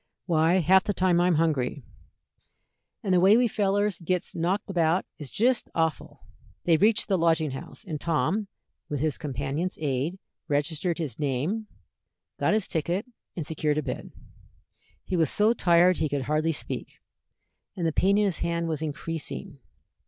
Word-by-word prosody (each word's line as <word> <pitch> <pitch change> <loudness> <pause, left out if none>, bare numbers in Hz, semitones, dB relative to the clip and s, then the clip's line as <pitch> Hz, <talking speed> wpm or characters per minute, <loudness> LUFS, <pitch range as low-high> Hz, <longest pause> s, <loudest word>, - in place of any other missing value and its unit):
Why, 170 +1 +3
half 185 +3 +5
the 205 - -1
time 180 -2 +3
I'm 175 -1 +3
hungry, 145 -4 0 1.2
and 190 - +1
the 180 - +5
way 195 +5 +6
we 245 0 +4
fellers 205 -1 0
gits 180 +1 -2
knocked 180 +5 -1
about 175 -2 +1
is 145 -3 -6
jist 240 - +1
awful." 160 -2 -1 0.4
They 170 - +4
reached 210 +6 +3
the 190 -3 +1
Lodging 160 -3 +2
House, 135 - -8
and 155 -6 -5
Tom, 170 +7 0 0.4
with 145 - -2
his 155 0 -1
companion's 145 +5 -3
aid, 145 +4 -1 0.3
registered 155 +4 0
his 150 -8 -4
name, 150 - -1 0.7
got - - +2
his 215 -3 0
ticket, 175 +5 -1 0.3
and 165 - -4
secured 155 -1 -1
a 155 - 0
bed. 130 - -5 0.9
He 185 - -3
was 160 -5 +2
so 215 +2 +3
tired 175 -3 +4
he 155 - 0
could 140 -2 -1
hardly 155 +3 +1
speak, 150 - -6 0.8
and 175 -4 -2
the 160 - +1
pain 195 +4 +3
in 210 - +3
his 190 -5 -1
hand 170 0 -1
was 160 -2 -2
increasing. 160 +2 -5
170 Hz, 160 wpm, -27 LUFS, 155-190 Hz, 1.2 s, way